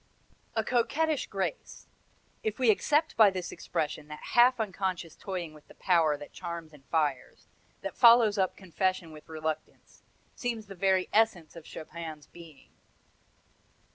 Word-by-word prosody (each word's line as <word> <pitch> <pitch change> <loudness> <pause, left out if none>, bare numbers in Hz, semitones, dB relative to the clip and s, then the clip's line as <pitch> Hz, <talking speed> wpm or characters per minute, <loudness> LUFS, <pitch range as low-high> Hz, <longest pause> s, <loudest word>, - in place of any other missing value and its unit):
"A 220 - +1
coquettish 280 +6 +1
grace 200 - -4 0.5
if 215 -1 -2
we 250 -4 +5
accept 300 +9 +1
by 215 -2 +7
this 185 -2 -5
expression 155 -2 -3
that 150 0 -9
half 245 +1 +6
unconscious 190 -5 -3
toying 180 -5 -5
with 150 -1 -17
the - - -16
power 165 -5 +2
that 145 - -11
charms 170 -3 -7
and 145 -2 -16
fires, 150 -4 -2 0.3
that - - -5
follows 230 -4 +6
up 190 -1 0
confession 185 -1 -1
with 155 0 -13
reluctance 160 0 -6 0.3
seems 235 -3 -3
the 195 - -9
very 190 0 +2
essence 210 -8 +2
of 165 -2 -11
Chopin's 160 -2 -8
being." 165 -3 -15
185 Hz, 140 wpm, -29 LUFS, 160-220 Hz, 0.5 s, by